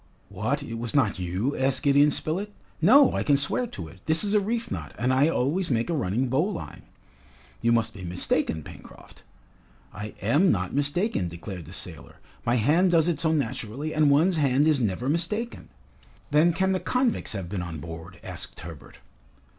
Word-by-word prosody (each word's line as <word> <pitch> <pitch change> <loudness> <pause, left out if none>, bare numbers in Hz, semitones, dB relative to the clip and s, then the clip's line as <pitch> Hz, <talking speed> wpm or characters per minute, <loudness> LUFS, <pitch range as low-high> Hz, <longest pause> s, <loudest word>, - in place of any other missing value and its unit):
"What, - - -2
it 115 0 -6
was 120 +1 -3
not 110 -9 +2
you?" 90 +10 -2
asked 135 0 0
Gideon 145 +1 +5
Spilett. 180 +8 -1 0.3
"No! 260 - +6
I - - 0
can 145 -2 +3
swear 145 - +1
to 90 - -8
it. 85 +4 -14
This 160 +3 +3
is 205 0 0
a 210 - +5
reef 230 +3 -3
knot, - - -6
and 125 +2 +1
I 135 +3 +4
always 165 +5 0
make 120 +4 0
a - - 0
running 125 - 0
bowline." 160 +10 -2 0.8
"You 115 - +2
must 115 -2 +1
be 100 -4 -10
mistaken, 85 -2 -1
Pencroft." - - -14 0.7
"I 105 0 -7
am 145 - +3
not 90 -2 -1
mistaken!" 145 - 0
declared 85 +1 -8
the - - -12
sailor. 80 -2 -6 0.3
"My 120 - +1
hand 155 - +3
does 165 -2 +3
it 165 -4 0
so 160 0 +2
naturally, 140 0 -3
and 150 -1 +3
one's 160 +5 +3
hand 140 -1 +3
is 155 -3 +4
never 115 +1 -1
mistaken!" 180 +10 -2 0.6
"Then 155 +4 +5
can 190 +3 0
the 185 - +1
convicts 250 - 0
have 95 -4 -4
been 95 0 -4
on 85 -2 -6
board?" 80 +4 -9
asked - - -7
Herbert. 80 -3 -11
140 Hz, 185 wpm, -26 LUFS, 100-165 Hz, 0.8 s, No